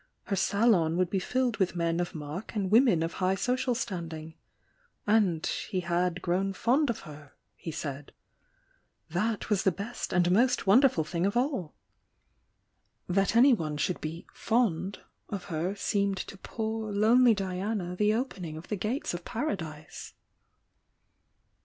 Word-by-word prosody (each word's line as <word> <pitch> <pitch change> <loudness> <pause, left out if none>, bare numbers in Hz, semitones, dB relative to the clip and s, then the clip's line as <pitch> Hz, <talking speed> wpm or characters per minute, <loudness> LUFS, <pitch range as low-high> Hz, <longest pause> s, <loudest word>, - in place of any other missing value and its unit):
Her 200 - -2
salon 195 -4 +3
would 185 -1 +1
be 195 - +1
filled 250 +3 0
with 190 -3 0
men 170 0 0
of 175 -1 -3
mark 155 +9 -6
and 195 -3 -1
women 220 -8 +5
of 165 - -3
high 185 +1 +3
social 250 +4 0
standing. 165 -8 -5 0.7
And 205 -7 +2
he 185 -3 -2
"had 175 +1 -1
grown 190 +2 0
fond 265 +8 +2
of 230 - -2
her" 150 -3 -12 0.2
he - - -8
said. 145 -2 -5 1.0
That 215 +6 -1
was 200 -2 +3
the 190 - +3
best 200 +7 -5
and 175 -1 +3
most 240 +7 +3
wonderful 215 - +5
thing 170 +4 -1
of 200 - -1
all! 245 - -1 1.3
"That 195 +4 +1
anyone 230 - +4
should 175 +4 -1
be 160 +2 -5
"fond" 200 -5 0 0.3
of 200 -4 -4
her 175 +5 -1
seemed 200 -1 0
to 195 - -6
poor, 220 +2 -4
lonely 225 +3 +5
Diana 190 -1 -3
the 210 +3 +2
opening 185 - -4
of 160 - -11
the 210 - 0
gates 220 +7 -2
of 175 0 -5
Paradise. 165 - -5
195 Hz, 145 wpm, -29 LUFS, 170-225 Hz, 1.3 s, women